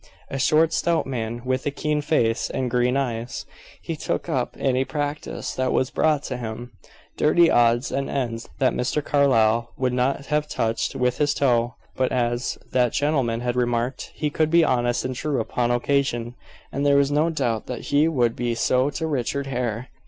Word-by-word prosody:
A 135 - -3
short 155 +4 +3
stout 170 -1 +1
man, 120 -2 -4
with 130 +1 0
a - - +3
keen 150 +1 -1
face 120 -6 +1
and 130 -2 -2
green 125 +2 +2
eyes. 120 -3 -3 0.4
He 165 - -3
took 155 - -3
up 130 -7 -1
any 130 -1 +1
practice 145 +2 -4
that 130 0 0
was 130 - +1
brought 150 -2 +2
to 130 - -4
him 120 +1 -6 0.5
dirty 165 +2 +4
odds 120 +2 +3
and 135 0 -2
ends 120 -4 -3
that 130 -2 +2
Mr. 140 +4 -1
Carlyle 115 -5 +3
would 130 -2 0
not 130 +3 0
have 150 +1 0
touched 115 -4 -1
with 125 -1 0
his 145 -1 +2
toe 120 -3 +1 0.2
but, 130 -1 0
as 120 0 -1
that 125 -2 +2
gentleman 135 -6 0
had 120 0 -1
remarked, 120 +1 -1
he 150 -1 -2
could 155 +1 +1
be 170 +1 +5
honest 120 -3 +1
and 130 0 -3
true 145 +1 -1
upon 120 +2 -1
occasion, 120 -1 0 0.4
and 140 - -2
there 140 -1 +4
was 140 0 +3
no 150 +3 +2
doubt 125 -9 -1
that 125 - -5
he 145 +2 +5
would 125 -7 +1
be 120 -1 -1
so 130 +3 +2
to 160 +2 -3
Richard 140 -1 -1
Hare. 125 -2 -3
130 Hz, 185 wpm, -23 LUFS, 120-145 Hz, 0.5 s, be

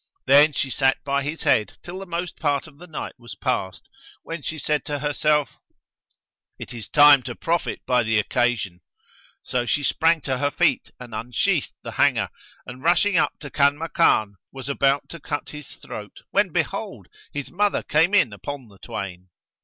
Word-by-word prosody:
Then 145 +2 +7
she 135 -2 -1
sat 135 +1 +2
by 140 0 0
his 150 +4 -4
head 105 - +2
till 180 +2 -7
the 195 - -8
most 175 0 -4
part 145 -3 0
of 150 -2 -16
the 180 - -11
night 160 - -6
was 120 -1 -10
past, 95 -8 -2 0.4
when 165 -1 -6
she 155 +3 -4
said 150 0 -1
to 145 - -2
herself, 150 0 0 1.0
"It - - -8
is 115 -3 -7
time 145 -2 +8
to 120 -1 -6
profit 170 +1 -2
by 125 -1 +3
the 110 -1 +1
occasion." 105 -5 0 0.6
So 125 -2 -2
she 145 - +1
sprang 165 +2 +3
to 130 -1 -2
her 145 0 +2
feet - - +1
and 120 -2 -10
unsheathed 115 +2 0
the - - -6
hanger - - +3 0.4
and 125 +1 -9
rushing 180 +5 +3
up - - 0
to 140 -3 -8
Kanmakan, 140 -8 +2
was 135 0 -6
about 140 0 +2
to 170 - -8
cut 145 0 -4
his 150 -2 -9
throat - - -10
when - - +3
behold, - - -3 0.3
his 145 -1 -5
mother 205 +3 +1
came 165 +7 +3
in 130 - +4
upon 130 +5 -7
the 100 -2 -19
twain. 95 -3 -7
140 Hz, 175 wpm, -23 LUFS, 120-155 Hz, 1.0 s, time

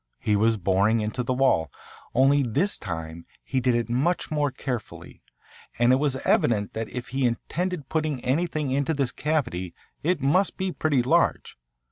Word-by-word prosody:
He 105 - +1
was 110 +2 +3
boring 100 +4 +2
into 110 +3 -2
the 125 - -2
wall, 85 - +2 0.4
only 135 +3 +5
this 140 - 0
time 80 -2 -6 0.2
he 130 - -1
did 125 -1 +2
it 120 0 0
much 140 +11 0
more 150 -2 +1
carefully, 130 -3 -6 0.6
and 120 +2 +4
it - - +4
was 140 -1 0
evident 105 -3 +2
that 110 0 -4
if 125 -2 -6
he 135 +2 -1
intended 155 +6 -2
putting 155 -3 -1
anything 150 +1 0
into 140 +4 0
this 135 -3 0
cavity 120 - -2 0.3
it 175 +1 +1
must 150 +9 +2
be 190 0 -1
pretty 145 -7 +1
large. 125 - +1
130 Hz, 165 wpm, -25 LUFS, 115-150 Hz, 0.6 s, only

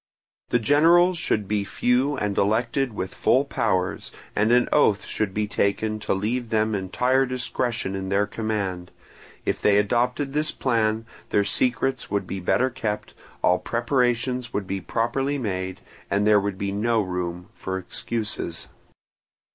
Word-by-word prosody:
The - - +3
generals 165 +8 +4
should 105 -9 0
be 105 0 0
few 125 +7 +1
and 105 -3 -1
elected 115 +5 +1
with 95 -2 -4
full 135 +3 +3
powers, 95 -9 -1 0.2
and 105 +3 +2
an 125 0 +4
oath 105 -9 +3
should 110 -3 -2
be 105 +2 -1
taken 110 +1 0
to 105 -2 -1
leave 115 +5 -2
them 110 0 +1
entire 125 +7 +1
discretion 120 -5 -2
in 95 -1 -4
their 100 +1 +2
command: 100 -6 -3 0.6
if - - -1
they 100 -1 +4
adopted 125 +6 +1
this 150 +1 +1
plan, 115 -3 0 0.2
their 100 - +3
secrets 125 +5 0
would 100 -1 -1
be 95 - -4
better 125 +8 +1
kept, 105 -4 -4 0.3
all 90 - +4
preparations 125 0 0
would 100 -3 -2
be 95 0 -3
properly 135 +8 -1
made, 95 -6 -3 0.3
and 100 +1 +1
there 105 -1 +6
would 100 -1 -3
be 100 0 -2
no 110 +2 +1
room 90 -1 -4
for 95 0 -4
excuses. 95 -2 -4
110 Hz, 150 wpm, -24 LUFS, 100-125 Hz, 0.6 s, there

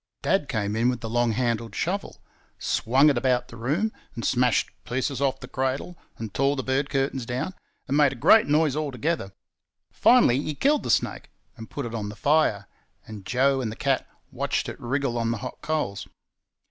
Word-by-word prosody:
Dad 190 -7 +1
came 105 -4 -1
in 115 +2 +2
with 125 -2 -2
the 115 - -5
long 120 -1 +2
handled 115 -1 -1
shovel, 195 +4 -2 0.4
swung 135 +6 +3
it 130 - 0
about 125 -1 +1
the 115 - -10
room, 150 - 0 0.2
and 115 - -4
smashed 125 -2 +2
pieces 130 +2 -2
off 135 -2 +1
the 125 - -8
cradle, 135 +6 -2 0.2
and 110 -3 -6
tore 140 +1 +2
the 130 - -3
bed 135 +2 0
curtains 135 -2 -1
down, 125 +10 -3 0.3
and 135 - 0
made 145 -2 +5
a - - -6
great 210 - +5
noise 150 -1 +2
altogether. 150 -5 -2 0.6
Finally, 190 - +5
he 150 0 -4
killed 290 - +2
the - - -5
snake - - 0 0.3
and 115 -2 -10
put 140 - -5
it 115 - -6
on 105 -3 -3
the 105 - -8
fire; 140 -8 +2 0.4
and 105 -3 -10
Joe 135 +2 +2
and 115 -4 -2
the - - -7
cat - - 0 0.2
watched - - -1
it - - -7
wriggle 125 -1 -1
on 115 0 0
the 115 - -1
hot - - -7
coals. 150 -12 -2
130 Hz, 195 wpm, -25 LUFS, 115-145 Hz, 0.6 s, made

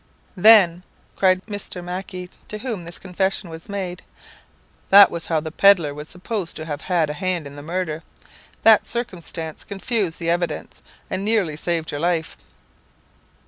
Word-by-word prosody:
"Then," 185 -4 +7 0.3
cried 185 -1 +2
Mr. 205 -4 -6
Mac 180 +2 -5
ie, 180 0 -6 0.2
to 215 - -6
whom 215 -6 -5
this 170 - -7
confession 190 -1 -2
was 160 +3 -9
made, 185 -3 -4 0.9
"that 200 +1 +9
was 170 -1 -5
how 160 -2 +1
the 160 +1 -6
pedlar 175 -5 +5
was 150 +1 -9
supposed 185 0 -4
to 155 - -6
have 145 -3 -5
had 170 -5 +1
a - - -4
hand 180 0 -2
in 140 0 -9
the 145 - -8
murder. 165 0 -3 0.6
That 220 -2 +6
circumstance 175 -8 -4
confused 200 -3 -2
the 170 -1 -1
evidence, 175 0 -3 0.3
and 190 - -3
nearly 205 -8 +1
saved 165 +1 -2
your 145 - -4
life." 170 -1 0
180 Hz, 160 wpm, -22 LUFS, 165-195 Hz, 0.9 s, that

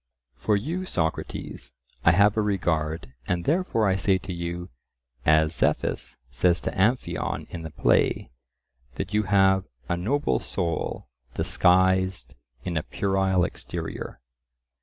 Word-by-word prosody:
For 70 +11 +1
you, 165 - -3
Socrates, 80 - -3 0.3
I - - +6
have 100 +3 +5
a 110 - +2
regard, 80 -8 -1
and 85 -1 -1
therefore 150 - +2
I 95 - +3
say 95 0 +2
to 95 0 -6
you, 85 -1 -5 0.6
as 80 +1 +4
Zethus - - -1
says 85 +6 +2
to - - -2
Amphion 110 +7 0
in 85 - -5
the 80 - -6
play, - - +2 0.6
that 100 - -4
you 105 - +3
have 95 -1 +4 0.2
"a 85 - 0
noble 125 +12 0
soul 85 -7 -3 0.3
disguised 95 -6 +2 0.3
in 85 -2 -2
a - - +1
puerile 95 0 +1
exterior." - - -5
95 Hz, 130 wpm, -26 LUFS, 85-100 Hz, 0.6 s, I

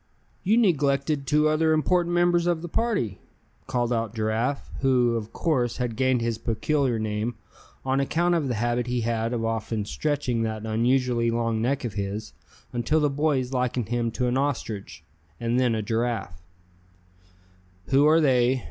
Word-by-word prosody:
"You 210 +5 +2
neglected 140 - +1
two 150 +1 +3
other 160 +1 +2
important 175 +2 +1
members 175 0 +3
of 170 -2 0
the - - -4
party!" 175 - -1 0.5
called 125 -2 0
out 115 -1 -2
Giraffe, 110 +5 -1
who, 125 -3 +3
of 110 -1 -4
course 130 -8 0
had 125 -3 -2
gained 130 0 +2
his 115 -1 -1
peculiar 125 +2 0
name 110 +2 -2 0.5
on 135 +1 +1
account 170 +6 +1
of 160 -5 +1
the 125 - -1
habit 120 +2 0
he 125 -1 -1
had 115 0 -1
of 115 -2 -1
often 115 -1 -2
stretching 140 -2 -1
that 110 -1 -3
unusually 120 +1 +1
long 115 -1 0
neck 130 +3 0
of 115 - -4
his, 100 +1 -4 0.4
until 125 +6 +1
the 150 -2 +2
boys 140 -3 0
likened 125 -3 -1
him 120 -1 0
to 125 - -1
an 125 +1 +1
ostrich, 105 - -3 0.4
and 120 +1 0
then 125 -3 +2
a 110 - -2
giraffe. 115 -5 -2 1.5
"Who 140 +2 +5
are 160 +2 +5
they?" 130 -3 +3
125 Hz, 165 wpm, -25 LUFS, 115-145 Hz, 1.5 s, Who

